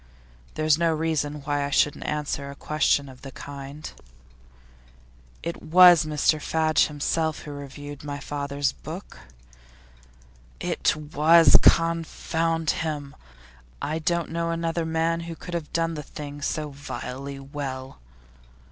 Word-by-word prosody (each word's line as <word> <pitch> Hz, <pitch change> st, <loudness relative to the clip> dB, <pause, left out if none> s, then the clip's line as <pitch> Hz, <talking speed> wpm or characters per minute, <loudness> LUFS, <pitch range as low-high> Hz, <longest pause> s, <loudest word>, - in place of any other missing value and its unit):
There's 155 Hz, 0 st, +3 dB
no 170 Hz, -1 st, +3 dB
reason 155 Hz, -2 st, -1 dB
why 145 Hz, 0 st, 0 dB
I 140 Hz, -, -2 dB
shouldn't 145 Hz, +1 st, +1 dB
answer 145 Hz, -2 st, -2 dB
a 140 Hz, -, -8 dB
question 145 Hz, -1 st, +1 dB
of 130 Hz, -1 st, -13 dB
the 135 Hz, -, -8 dB
kind.' 140 Hz, +2 st, -8 dB, 1.5 s
'It 170 Hz, 0 st, -4 dB
was 175 Hz, 0 st, +7 dB
Mr 155 Hz, 0 st, +2 dB
Fadge 155 Hz, +1 st, +2 dB
himself 155 Hz, +1 st, -1 dB
who 150 Hz, -, -7 dB
reviewed 145 Hz, +1 st, -8 dB
my 145 Hz, -1 st, -5 dB
father's 140 Hz, -1 st, -2 dB
book?' 165 Hz, +6 st, -9 dB, 1.4 s
'It -, -, +1 dB
was 155 Hz, +2 st, +5 dB
confound 165 Hz, 0 st, +2 dB
him! 150 Hz, -3 st, -4 dB, 0.6 s
I 155 Hz, +2 st, -2 dB
don't 170 Hz, +1 st, -1 dB
know 170 Hz, 0 st, -1 dB
another 165 Hz, 0 st, -1 dB
man 165 Hz, +1 st, +1 dB
who 170 Hz, 0 st, -6 dB
could 175 Hz, -, -9 dB
have 165 Hz, -3 st, -4 dB
done 165 Hz, 0 st, 0 dB
the 150 Hz, -, -4 dB
thing 145 Hz, 0 st, -8 dB
so 150 Hz, +1 st, -2 dB
vilely 140 Hz, -1 st, -6 dB
well. 135 Hz, -, -6 dB
150 Hz, 130 wpm, -25 LUFS, 145-165 Hz, 1.5 s, was